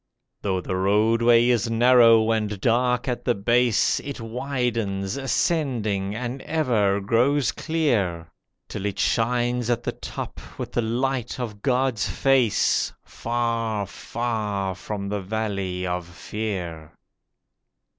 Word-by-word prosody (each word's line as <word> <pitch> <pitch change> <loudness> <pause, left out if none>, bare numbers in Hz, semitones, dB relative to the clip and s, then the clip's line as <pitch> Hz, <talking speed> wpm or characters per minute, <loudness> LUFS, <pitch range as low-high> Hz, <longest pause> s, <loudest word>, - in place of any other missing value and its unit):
Though 95 -2 -1
the 95 - -3
Roadway 115 +5 +4
is 120 -2 +2
narrow 115 -1 +5
and 105 -2 -1
dark 125 +3 +1
at 125 -2 -2
the 120 - +1
base, 120 +2 +2
It 140 -2 -7
widens 115 -4 -2
ascending, 120 - 0
and 125 +3 -4
ever 115 -11 +1
grows 125 +7 +2
clear, 100 - -1 0.4
Till 100 - -4
it 100 - -4
shines 120 +1 +1
at 120 0 0
the - - -1
top - - -7 0.2
with - - -5
the - - 0
Light 125 +2 -1
of 105 -5 -5
God's 130 -4 +1
face, 130 -5 +2
Far, 115 -3 -2
far 105 -3 -3
from 100 +2 -5
the 105 0 -2
Valley 100 -3 -3
of 90 -1 -3
Fear. 90 -4 -5
115 Hz, 120 wpm, -24 LUFS, 100-125 Hz, 0.4 s, narrow